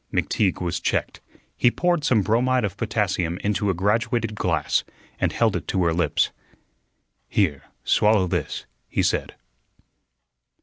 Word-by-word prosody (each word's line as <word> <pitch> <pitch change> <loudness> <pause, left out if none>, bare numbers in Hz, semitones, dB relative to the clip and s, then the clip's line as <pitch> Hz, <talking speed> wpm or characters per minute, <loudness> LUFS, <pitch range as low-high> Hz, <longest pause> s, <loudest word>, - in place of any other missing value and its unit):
McTeague 100 -4 0
was 85 -1 -2
checked. - - -2 0.3
He 120 - +4
poured 175 +3 0
some 115 -8 +3
bromide 125 +3 +2
of 100 - -4
potassium 85 0 -1
into 105 0 0
a 95 - +1
graduated 115 +4 0
glass 85 -8 0 0.4
and - - +1
held - - +1
it - - -4
to 95 - 0
her 85 -1 +2
lips. 85 +1 +1 1.0
"Here, 80 -9 0 0.2
swallow 105 -3 +3
this," 90 - -3 0.2
he - - 0
said. - - -1
105 Hz, 135 wpm, -24 LUFS, 90-115 Hz, 1.0 s, He